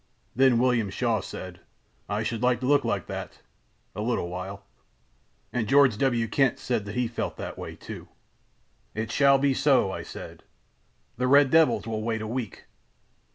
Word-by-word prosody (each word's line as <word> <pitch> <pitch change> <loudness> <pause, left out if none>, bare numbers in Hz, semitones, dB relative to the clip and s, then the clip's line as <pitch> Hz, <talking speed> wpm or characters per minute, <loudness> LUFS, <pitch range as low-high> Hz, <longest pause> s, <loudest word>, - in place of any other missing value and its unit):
Then 130 -1 +5
William 120 -4 +2
Shaw 115 +2 0
said: 90 -1 -8 0.5
'I 105 +2 -1
should 115 0 -3
like 125 -1 +2
to - - -2
look 145 +1 +4
like - - -1
that—a - - -10
little 110 -6 -1
while.' 95 +2 -7 0.9
"And 115 -3 -1
George 135 -2 +5
W. 120 -4 +1
Kent 135 +1 +2
said 115 -5 -2
that 105 - -7
he 125 -1 +1
felt 115 - -4
that - - -6
way, - - -7
too. - - -9 0.9
"'It 110 +1 -3
shall 140 -1 +5
be 140 0 +2
so,' 130 -8 +3
I - - -5
said: - - -9 0.8
'the 125 - 0
red 140 0 +5
devils 160 -1 +4
will 110 -1 -3
wait 110 0 -2
a - - -4
week. 115 -3 -5
120 Hz, 165 wpm, -26 LUFS, 105-130 Hz, 0.9 s, Then